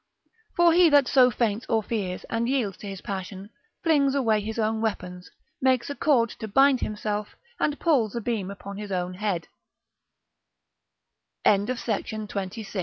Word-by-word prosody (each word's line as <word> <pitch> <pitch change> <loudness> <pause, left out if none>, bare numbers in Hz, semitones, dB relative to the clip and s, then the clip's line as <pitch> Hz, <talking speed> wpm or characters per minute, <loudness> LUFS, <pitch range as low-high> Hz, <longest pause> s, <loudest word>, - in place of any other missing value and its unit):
For 345 -1 +5
he 350 0 +6
that 285 -3 +5
so 255 -1 +5
faints 230 0 -1
or 225 -1 +2
fears, 195 -5 -3
and 235 +1 -2
yields 240 -8 0
to 205 - -9
his 195 -2 -7
passion, 195 +1 -6 0.3
flings 285 -4 +3
away 225 -6 +2
his 220 +2 -5
own 220 0 0
weapons, 180 -5 -4 0.3
makes 260 0 +2
a - - -5
cord 245 -8 +2
to 220 - -5
bind 270 +4 +4
himself, 210 0 -3 0.2
and 295 -1 0
pulls 250 - +2
a 235 - -2
beam 215 -4 -2
upon 200 0 -8
his 205 -1 -7
own 180 -1 -2
hea 185 -3 -2
220 Hz, 145 wpm, -26 LUFS, 200-260 Hz, 0.3 s, he